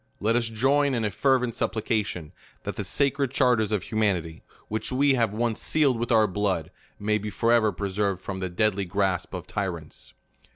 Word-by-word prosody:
Let 110 +3 +1
us 120 -1 +1
join 135 +5 +2
in 115 -2 0
a 105 - -1
fervent 125 +2 +2
supplica 110 0 0
tion, 80 -6 -6 0.3
that - - -4
the - - -3
sacred 140 -1 +1
charters 120 -5 +2
of 105 -4 0
humanity, 95 -8 -1 0.3
which 110 +4 -3
we 140 +2 +3
have 115 -5 +2
once 115 +1 -1
sealed 140 -6 +2
with 120 +1 -2
our 110 -2 +5
blood, 95 -4 -1 0.3
may 105 +1 0
be 105 +1 -4
forever 115 +1 +3
pre 100 +1 -4
served 100 -1 0
from 95 0 -5
the 95 -1 -3
deadly 100 +2 +1
grasp 95 0 -1
of 90 - -6
tyrants. 90 -7 -5
110 Hz, 190 wpm, -26 LUFS, 95-120 Hz, 0.3 s, our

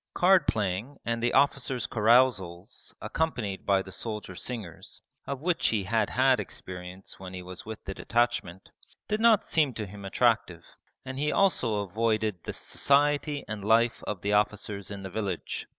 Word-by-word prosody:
Cardplaying 130 - +2
and 115 0 -1
the 120 +1 +2
officers' 135 -3 +2
carousals 105 -6 +1
accompanied 120 -12 -2
by 100 -1 +3
the 95 - -11
soldier 105 -2 -5
singers, 100 -4 -7 0.2
of 140 -1 -4
which 175 +1 +1
he 105 -3 +1
had 110 +2 +1
had 130 -1 +3
experience 90 -1 -7
when 95 -1 -8
he 90 - -6
was 90 +3 -10
with 110 -1 -7
the 95 - -5
detachment, 115 -5 -1 0.4
did 215 - 0
not 225 -2 +5
seem 150 -7 +2
to 110 - -3
him 100 +1 -10
attractive, 100 -4 +1 0.4
and 130 0 -5
he 150 +1 +1
also 120 - +2
avoided 110 -1 0
the - - -4
society 145 +1 +1
and 105 -2 -5
life 115 +3 +3
of 100 -4 -3
the 100 +1 +1
officers 105 -1 0
in 100 -1 -7
the 95 - -6
village. 100 -3 -3
110 Hz, 160 wpm, -28 LUFS, 95-130 Hz, 0.4 s, not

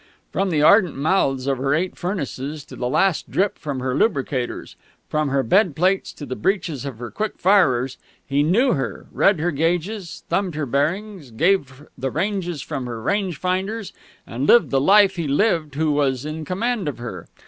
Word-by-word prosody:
From 195 0 0
the 150 -4 +1
ardent 185 -2 +5
mouths 140 -4 +1
of 135 -2 0
her 135 +2 +1
eight 180 +4 -1
furnaces 150 -5 -4
to - - -11
the 125 - -2
last 165 +5 +1
drip 200 +1 0
from 140 -4 -4
her 130 0 -1
lubricators, 135 - -1 0.3
from 155 -1 0
her 135 0 +1
bed 180 - +3
plates 185 +4 +1
to 145 - -8
the 130 -1 -5
breeches 160 - -1
of 135 -5 -6
her 120 0 -7
quick 215 0 -3
firers, 135 -10 +3 0.3
he 145 -3 +1
knew 215 - +3
her 135 - -3
read 195 -4 +3
her 175 +3 0
gauges, 170 +5 -2
thumbed 185 -5 -1
her 155 -1 -2
bearings, 165 - -2
gave 140 +1 0
the 135 - -3
ranges 175 -2 -2
from 135 -5 -4
her 115 -2 -5
range 185 - -1
finders, 190 +5 -2 0.3
and 130 +5 -3
lived 240 - +5
the 135 - +2
life 195 +3 +5
he 165 -3 -2
lived 155 -1 +1
who 155 +1 +1
was 140 -2 0
in 155 +1 -5
command 210 +2 -1
of 145 - -3
her. 115 -8 -7
155 Hz, 185 wpm, -22 LUFS, 135-190 Hz, 0.3 s, ardent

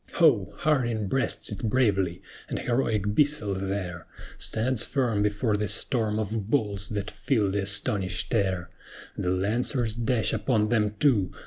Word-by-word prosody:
Ho! 110 - +3
HARDIN 120 -8 +1
breasts 130 -2 -1
it 105 - -6
bravely! 105 -7 +1 0.3
and - - -2
heroic 110 -5 0
BISSELL 145 -7 +1
there 95 -2 -4 0.3
Stands 120 +1 +1
firm 120 -7 0
before 105 +2 +1
the 105 0 -1
storm 110 -4 0
of 110 -1 -3
balls 105 -7 0
that 105 -1 -3
fill 105 0 0
the 100 +1 0
astonished 100 +1 0
air: 95 -5 0 0.4
The 90 - -2
Lancers 110 +5 0
dash 120 0 +1
upon 110 -5 +1
them 105 -3 +1
too! 110 -11 +3
105 Hz, 140 wpm, -27 LUFS, 100-120 Hz, 0.4 s, Ho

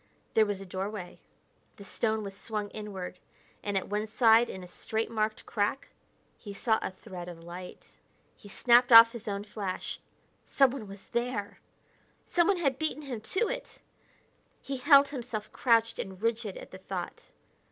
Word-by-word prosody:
There 220 -1 +4
was 205 -2 -2
a 195 - -8
doorway; 190 0 -5 0.6
the 200 - -12
stone 220 +1 -1
was 195 -1 -7
swung 210 0 -4
inward; 195 -4 -7 0.4
and 205 -1 -1
at 190 - -2
one 210 +1 -2
side 225 +1 +5
in 190 - -7
a - - -9
straight 220 +5 -3
marked 215 -1 -1
crack, 205 +5 -1 0.5
he 205 -3 -9
saw 220 +1 +2
a - - -2
thread 180 -1 -9
of 165 -1 -10
light. 180 +2 -10 0.4
He 205 - -15
snapped 245 +4 +4
off 230 0 +11
his 235 -2 -9
own 200 -1 -2
flash. 200 -3 -5 0.5
Someone 270 -5 +2
was 195 0 -12
there! 235 -4 -2 0.7
Someone 355 +2 +2
had 275 -6 0
beaten 310 -1 -2
him 250 -6 -5
to 375 - 0
it! - - -6 0.8
He 275 - -5
held 280 +1 +6
himself 240 -6 -5
crouched 230 -2 +2
and 190 -1 -5
rigid 225 -2 -1
at - - -11
the 185 - -10
thought. 185 -2 -6
215 Hz, 165 wpm, -29 LUFS, 195-240 Hz, 0.8 s, off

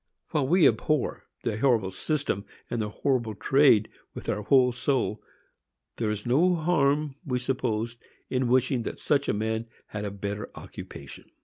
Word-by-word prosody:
While 150 -5 +1
we 170 0 +6
abhor 135 +5 0 0.2
the 110 -2 -1
horrible 115 -7 +2
system 140 - -1 0.3
and 120 - 0
the 105 - -2
horrible 120 -1 0
trade 135 -2 +4 0.3
with - - -6
our 105 - 0
whole 125 +3 +4
soul, 125 -3 -1 0.8
there 110 -2 0
is 105 -1 -3
no 165 +9 +4
harm, 150 -3 +1
we 130 -6 -1
suppose, 120 -3 -2 0.3
in 130 -1 0
wishing 130 0 +2
that - - -5
such 145 -2 +1
a - - +2
man 110 +2 -1 0.2
had 105 -1 -4
a 105 - -2
better 100 +1 -5
occupation. - - -10
125 Hz, 155 wpm, -27 LUFS, 110-140 Hz, 0.8 s, we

